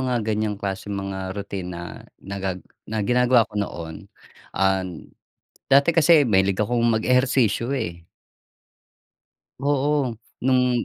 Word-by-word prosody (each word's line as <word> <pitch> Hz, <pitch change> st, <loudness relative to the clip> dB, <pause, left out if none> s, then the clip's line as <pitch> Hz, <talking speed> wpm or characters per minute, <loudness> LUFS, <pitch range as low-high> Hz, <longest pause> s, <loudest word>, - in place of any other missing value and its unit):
mga 125 Hz, -4 st, -1 dB
ganyang 110 Hz, -1 st, -1 dB
klaseng 100 Hz, 0 st, -4 dB
mga 95 Hz, 0 st, -5 dB
rutina 90 Hz, -3 st, -6 dB, 0.2 s
nagag 95 Hz, -1 st, -5 dB, 0.2 s
na 110 Hz, -1 st, -2 dB
ginagawa 125 Hz, 0 st, +4 dB
ko 115 Hz, -, -25 dB
noon, 85 Hz, -5 st, -6 dB, 0.5 s
an 95 Hz, -3 st, -1 dB, 0.6 s
dati 140 Hz, +5 st, +5 dB
kasi 160 Hz, -3 st, +5 dB
mahilig 95 Hz, -3 st, +2 dB
akong 120 Hz, +3 st, +1 dB
mag 115 Hz, -2 st, +1 dB
ehersisyo, 125 Hz, -2 st, +2 dB
eh. 100 Hz, -11 st, -3 dB, 1.6 s
Oo, 145 Hz, -2 st, +1 dB, 0.3 s
nung 125 Hz, -2 st, +2 dB
110 Hz, 110 wpm, -23 LUFS, 95-125 Hz, 1.6 s, dati